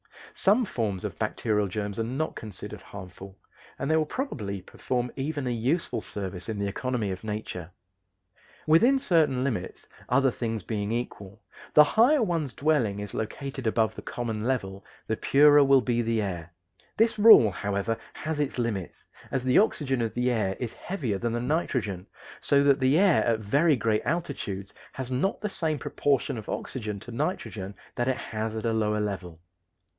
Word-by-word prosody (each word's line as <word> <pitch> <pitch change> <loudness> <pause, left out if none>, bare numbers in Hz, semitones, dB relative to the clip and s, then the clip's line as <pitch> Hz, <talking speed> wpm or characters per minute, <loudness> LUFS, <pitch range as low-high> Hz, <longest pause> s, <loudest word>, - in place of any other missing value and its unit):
Some 215 +6 +3
forms 110 - -2
of - - -6
bacterial 105 -2 0
germs 100 +2 -4
are 115 - 0
not 135 +7 -2
considered 105 -4 -7
harmful, 95 0 -10 0.4
and 140 +3 -2
they 160 0 +4
probably 110 - -4
perform 125 +5 -3
even 145 0 -3
a 125 - 0
useful 130 +9 -1
service 95 -1 -6
in 110 - -3
the 100 0 -1
economy 115 -1 -2
of 95 - -6
nature. 105 -6 -5 1.0
Within 230 - +5
certain 160 - +2
limits, 110 -10 -3 0.2
other 135 +1 +4
things 115 -4 -3
being 105 -2 -3
equal, 100 -5 -5 0.3
the 150 - +10
higher 240 - +4
one's 165 - -1
dwelling 140 -10 +1
is 105 -1 -6
located 135 +3 -4
above 110 0 +2
the - - -8
common 115 -3 -4
level 100 -7 -2 0.2
the 110 - -2
purer 145 +3 +6
will 135 -1 +5
be 120 0 0
the 115 -1 0
air. 90 -4 -4 0.5
This 225 0 +3
rule, 205 - +9
however, 100 +4 -1 0.2
has 155 -1 -4
its 145 -3 -1
limits, 110 -8 -3 0.3
as 135 -2 -1
the 130 0 +4
oxygen 135 - +1
of 115 -1 -2
the 125 +1 +1
air 100 -5 0
is 120 -3 -4
heavier 130 - -3
than 120 +1 -1
the 120 - -1
nitrogen, 120 - -1 0.3
so 140 0 +3
that 140 0 +4
the 130 +3 +3
air 195 -2 +4
at 115 -2 +1
very 145 +9 +3
great 110 -3 +1
altitudes 105 - -3 0.2
has 130 -1 -5
not 140 +11 0
the 210 - -2
same 160 -5 -1
proportion 135 -4 0
of 110 - -10
oxygen 105 -5 -4
to 120 - -10
nitrogen 105 - -3 0.2
that 120 - -1
it 130 -1 +1
has 110 0 -4
at 110 - -4
a 115 - +1
lower 105 -1 +1
level. 95 -5 -4
120 Hz, 170 wpm, -27 LUFS, 105-145 Hz, 1.0 s, the